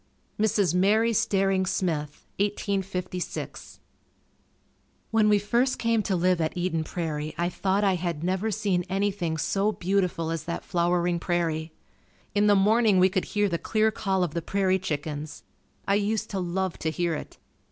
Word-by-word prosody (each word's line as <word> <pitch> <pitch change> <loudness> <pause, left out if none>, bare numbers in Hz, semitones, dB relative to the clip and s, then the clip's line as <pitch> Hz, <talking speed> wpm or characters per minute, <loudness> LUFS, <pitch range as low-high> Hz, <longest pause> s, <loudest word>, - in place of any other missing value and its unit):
Mrs. 205 -5 +2
Mary 215 +5 +3
Staring 195 -2 +2
Smith 155 -6 -2
1856. 195 -3 -3 1.3
When 220 -1 +4
we 210 - +5
first 235 +6 +1
came 230 -1 +1
to 200 -2 -1
live 180 0 +2
at 160 +3 -2
Eden 175 -3 0
Prairie 155 -2 -4
I 175 +1 0
thought 195 +3 0
I 195 -2 +3
had 170 -3 -3
never 190 +4 0
seen 190 -3 0
anything 190 -4 -1
so 200 +6 +1
beautiful 180 -4 -1
as 165 -2 -3
that 170 - -4
flowering 175 -1 +1
prairie. 165 -2 -1 0.6
In 205 +1 +3
the 205 - +6
morning 210 +1 +4
we 185 +1 +5
could 185 0 -1
hear 205 0 +1
the 170 -3 -2
clear 220 0 +1
call 195 -4 0
of 165 -4 -2
the 170 - -2
prairie 190 +1 +1
chickens. 150 -3 -4 0.4
I 200 - +3
used 215 +1 -1
to 195 - -2
love 185 0 -2
to 160 - -1
hear 170 +1 -1
it. 155 - -7
185 Hz, 160 wpm, -26 LUFS, 170-205 Hz, 1.3 s, the